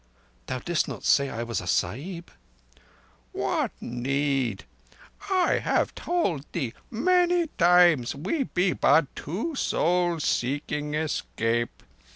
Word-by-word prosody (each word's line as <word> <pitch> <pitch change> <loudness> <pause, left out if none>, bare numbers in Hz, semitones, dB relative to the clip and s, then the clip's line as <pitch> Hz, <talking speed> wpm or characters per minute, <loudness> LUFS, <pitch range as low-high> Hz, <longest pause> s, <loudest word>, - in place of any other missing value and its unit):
"Thou 130 - -2
didst 170 +5 -1
not - - -7
say 140 -1 +3
I 115 -1 -4
was 115 -1 -3
a 90 - -9
Sahib?" 155 - -2 1.0
"What - - 0
need? 130 -2 -1 0.7
I 370 -2 +2
have - - 0
told 260 - -1
thee 135 -9 -2 0.2
many 355 +7 +2
times 175 -8 +5
we 205 - -1
be 180 -2 +1
but 145 0 +3
two 210 - -4
souls 175 - +1
seeking 145 +3 -1
escape. 120 -6 -2
150 Hz, 115 wpm, -26 LUFS, 130-180 Hz, 1.0 s, times